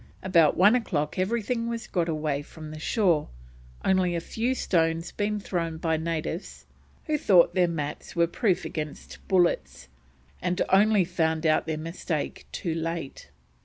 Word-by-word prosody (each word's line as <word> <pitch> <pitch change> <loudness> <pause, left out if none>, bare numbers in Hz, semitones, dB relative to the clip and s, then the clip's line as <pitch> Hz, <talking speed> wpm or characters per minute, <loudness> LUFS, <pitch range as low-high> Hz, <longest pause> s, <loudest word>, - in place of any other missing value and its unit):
About 170 -5 +4
one 200 +5 +6
o'clock 175 -10 -1
everything 230 +4 -1
was 230 -1 -4
got 175 -2 -1
away 150 -3 -1
from 155 +1 -10
the 155 - -8
shore, 170 -4 +1 0.6
only 185 -2 +2
a - - 0
few 235 +9 -2
stones 165 -5 0
being 210 0 -1
thrown 165 -5 -3
by 160 0 0
natives 165 +2 -4 0.4
who 305 -1 0
thought 180 -8 +5
their 180 -2 +3
mats 150 -2 -5
were 170 0 +4
proof 185 +2 0
against 150 -2 -6
bullets, 170 - +1 0.5
and 180 0 -1
only 200 0 +4
found 160 -2 0
out 155 0 +2
their 160 -1 -1
mistake 160 -1 -4
too 170 - -3
late. 165 -3 -4
170 Hz, 150 wpm, -27 LUFS, 160-190 Hz, 0.6 s, one